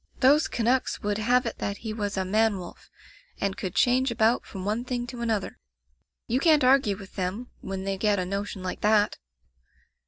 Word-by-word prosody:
Those 285 +4 +5
Canucks 245 +3 0
would 205 0 -1
have 245 +3 +2
it 230 - -4
that 200 0 -3
he 220 - -2
was 205 -2 -3
a 190 - 0
man 215 +2 +2
wolf, 180 -2 -10 0.5
and 200 -1 -1
could 185 - -5
change 255 +2 +3
about 230 0 +2
from 190 -2 -7
one 215 +4 -1
thing 245 -1 -3
to 240 0 -8
another. 220 -4 -2 0.7
You 245 +3 0
can't 305 -2 +4
argue 255 -6 +4
with 195 -2 -12
them, 195 +7 -3
when 190 0 -5
they 195 -1 -3
get 210 0 +2
a 185 - -1
notion 200 0 -4
like 185 - -4
that. 210 0 +3
215 Hz, 190 wpm, -26 LUFS, 195-245 Hz, 0.7 s, Those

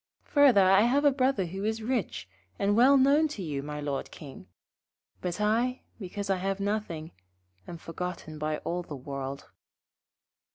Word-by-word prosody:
Further, 275 -9 +5
I 195 +1 +6
have 265 +6 +2
a 285 - +6
Brother 260 -7 +1
who 190 +3 -6
is 220 +1 -2
rich, 235 - -2 0.3
and 200 +1 +1
well 260 +5 +6
known 280 +4 +4
to 250 -10 -6
you, 145 -4 -3
my 150 +1 -6
Lord 145 -2 -3
King; 135 -10 -11 0.7
but 180 +1 -3
I, 235 +5 +1 0.2
because 200 +1 -5
I 195 -1 +1
have 195 +1 -2
nothing, 200 -6 -3 0.6
am 170 - -7
forgotten 165 -2 -6
by 155 0 -1
all 175 +1 -1
the 155 -4 -8
world.' 135 0 -6
195 Hz, 160 wpm, -28 LUFS, 155-235 Hz, 0.7 s, I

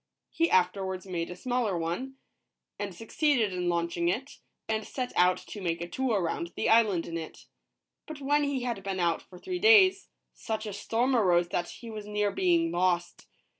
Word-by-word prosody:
He 335 0 +1
afterwards 185 +1 +1
made 170 -3 -3
a 180 - -6
smaller 240 -2 -1
one, 175 +12 -3 0.6
and 200 -3 -4
succeeded 225 - +1
in 180 -1 -1
launching 170 0 0
it, 260 +10 -3 0.3
and 220 0 -1
set 250 +3 -5
out 180 +1 +4
to 205 - -9
make 170 -2 -1
a 170 - -4
tour 240 +1 0
round 170 0 -3
the - - 0
island 215 -6 +4
in 165 0 -4
it. 160 - -10 0.6
But 310 -3 -7
when 290 +1 +2
he 280 -3 -1
had 235 -5 -3
been 190 0 -3
out 170 -2 +1
for 180 - -15
three 360 - -4
days, 395 -2 +6 0.3
such 220 -1 -4
a 210 - -5
storm 235 +6 0
arose 175 -6 +3
that 175 0 -2
he 230 -1 -9
was 210 -1 -7
near 210 -1 0
being 340 - +2
lost. 175 -1 0
205 Hz, 185 wpm, -29 LUFS, 175-255 Hz, 0.6 s, days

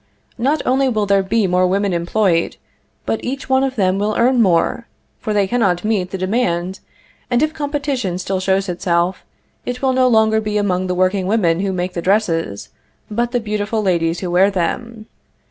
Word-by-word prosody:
Not 280 +6 +1
only 265 +1 +2
will 215 -4 0
there 200 0 +3
be 205 +3 +1
more 180 0 +2
women 195 +1 0
employed, 170 0 0 0.5
but 225 - -2
each 270 +3 -4
one 265 0 +3
of 270 -1 -1
them 190 -3 +1
will 210 +1 0
earn 245 +1 +3
more, 190 +4 +1 0.3
for 215 - -4
they 205 -1 +2
cannot 190 -5 0
meet 200 -5 0
the 190 - -4
demand, 185 -2 -1 0.5
and 245 +3 +2
if 310 0 0
competition 285 - -2
still 185 +1 -2
shows 190 +1 0
itself, 175 0 -1 0.4
it 250 +1 -5
will 260 -1 +3
no 255 0 +3
longer 220 -2 +3
be 210 -1 -2
among 185 -3 0
the 180 - -1
workingwomen 185 -1 +1
who 195 0 -1
make 180 0 -3
the 170 - -3
dresses, 165 - 0 0.4
but 235 +3 0
the 245 - +1
beautiful 215 0 -2
ladies 170 -3 0
who 180 -2 -3
wear 185 +3 +4
them. 215 +4 -3
200 Hz, 180 wpm, -18 LUFS, 180-235 Hz, 0.5 s, wear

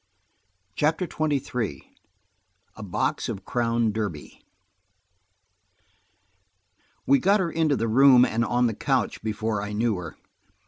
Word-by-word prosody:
CHAPTER 155 - +1
XXIII 135 - -3 0.8
A - - -10
BOX 100 -4 -2
OF 95 - -6
CROWN 115 -2 0
DERBY 100 -9 -6 2.6
WE 140 +1 +4
GOT 200 +3 +3
her 175 -3 -1
into 155 -3 +1
the 115 -2 -1
room 125 +2 +6
and 115 +1 -1
on 120 +1 +1
the 115 - 0
couch - - -1
before 110 -1 -2
I 105 +1 -5
knew 110 -1 0
her. 85 -3 -8
115 Hz, 120 wpm, -25 LUFS, 105-140 Hz, 2.6 s, room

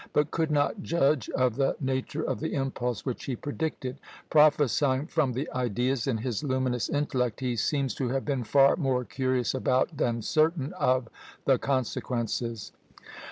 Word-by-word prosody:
but 150 0 +2
could 160 -1 0
not 150 +7 +1
judge 145 - +1
of 125 -3 +1
the 135 -1 +2
nature 135 +3 -2
of - - -2
the 160 - -3
impulse 125 -4 -2
which 130 -3 -4
he 130 - -2
predicted; 145 -1 -4 0.3
prophesying 145 -2 +4
from 150 -6 0
the 135 +6 -2
ideas 125 +1 0
in 125 -4 +1
his 120 +3 -3
luminous 130 -3 0
intellect, 130 -5 -1
he 125 -2 -1
seems 135 +3 0
to 130 -3 -2
have 135 +1 -1
been 135 -4 -1
far 135 +5 +5
more 135 -6 0
curious 130 -3 0
about, 130 +4 +1
than 120 -5 0
certain 155 0 +1
of, 130 -1 +1 0.4
the 135 -2 +4
consequences. 120 -4 -2
130 Hz, 160 wpm, -28 LUFS, 125-145 Hz, 0.4 s, far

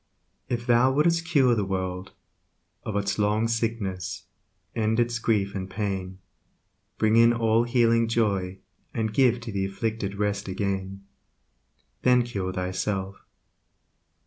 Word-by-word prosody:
If 120 -1 -2
thou 120 +2 +4
would'st 165 +4 +2
cure 140 -7 +4
the 105 -3 0
world 95 0 -4 0.7
Of 105 - -5
its 100 0 -1
long 105 +2 +2
sickness, 115 -5 -2 0.5
end 110 0 +1
its 120 -1 +1
grief 105 -4 0
and 95 -1 -5
pain; 95 -3 -3 0.8
Bring 110 +1 +3
in 115 0 +7
all 115 0 +2
healing 115 -1 +3
joy, 100 -5 0 0.4
And 110 -1 -1
give 125 -1 +3
to 120 -1 -6
the 100 -1 -1
afflicted 100 0 -3
rest 105 0 -1
again, 95 0 -3 1.0
Then 125 -1 +4
cure 100 -6 -3
thyself. 95 +1 -3
110 Hz, 125 wpm, -26 LUFS, 95-115 Hz, 1.0 s, in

